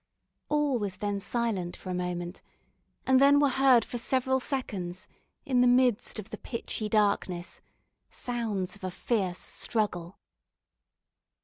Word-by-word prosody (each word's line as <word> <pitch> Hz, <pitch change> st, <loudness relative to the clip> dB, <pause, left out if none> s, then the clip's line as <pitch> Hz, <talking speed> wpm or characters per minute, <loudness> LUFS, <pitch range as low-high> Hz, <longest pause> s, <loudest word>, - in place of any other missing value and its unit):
All 295 Hz, -4 st, +2 dB
was 200 Hz, -3 st, -3 dB
then 205 Hz, -1 st, -2 dB
silent 200 Hz, -5 st, -2 dB
for 185 Hz, -, -7 dB
a -, -, -1 dB
moment, 180 Hz, 0 st, -3 dB, 0.6 s
and 260 Hz, 0 st, +5 dB
then 285 Hz, +1 st, +7 dB
were 285 Hz, -1 st, +4 dB
heard 260 Hz, -3 st, +5 dB
for 240 Hz, -, -4 dB
several 260 Hz, +2 st, +1 dB
seconds, 205 Hz, -9 st, -4 dB, 0.4 s
in 255 Hz, -2 st, +3 dB
the 250 Hz, -, +5 dB
midst 245 Hz, -3 st, +3 dB
of 215 Hz, -1 st, -7 dB
the -, -, -6 dB
pitchy 225 Hz, -3 st, -4 dB
darkness, 200 Hz, -4 st, 0 dB, 0.5 s
sounds 220 Hz, -7 st, -3 dB
of 205 Hz, -, -17 dB
a 185 Hz, -, -1 dB
fierce 185 Hz, -2 st, -1 dB
struggle. 190 Hz, -7 st, -2 dB
215 Hz, 135 wpm, -29 LUFS, 185-250 Hz, 0.6 s, then